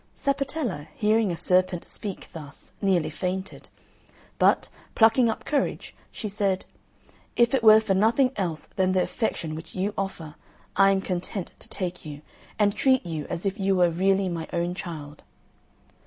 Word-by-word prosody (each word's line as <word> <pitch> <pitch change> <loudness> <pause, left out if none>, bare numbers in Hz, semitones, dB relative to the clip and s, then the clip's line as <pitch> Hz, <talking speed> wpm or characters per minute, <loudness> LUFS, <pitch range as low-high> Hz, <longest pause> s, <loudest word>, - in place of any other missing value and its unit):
Sapatella, 275 - -2
hearing 215 -2 +2
a 170 - -3
serpent 180 +1 +2
speak 200 -3 -5
thus, 150 -3 -11
nearly 185 -5 +2
fainted; 190 +1 -4 0.7
but, - - +4 0.3
plucking 225 +2 +5
up 220 - -4
courage, 290 -2 -1 0.2
she 220 - -5
said, 195 -2 -1 0.7
"If 235 +1 +3
it 265 - +3
were 215 -1 +9
for 220 -3 0
nothing 230 +7 +3
else 170 -6 -2
than 185 -1 0
the 185 -1 +3
affection 170 -8 -2
which 160 +1 -8
you 195 +3 -1
offer, 180 -6 -4 0.4
I 195 +1 +6
am 195 -1 +2
content 185 0 -4
to - - -8
take 180 -2 -4
you, 150 -1 -9 0.3
and 205 -1 +3
treat 260 -2 +2
you 160 -3 -4
as 170 - -4
if 195 +2 -1
you 195 0 +2
were 175 -2 +4
really 190 +3 +2
my 170 -2 -4
own 175 +1 -1
child." 155 -5 -7
190 Hz, 160 wpm, -26 LUFS, 175-215 Hz, 0.7 s, were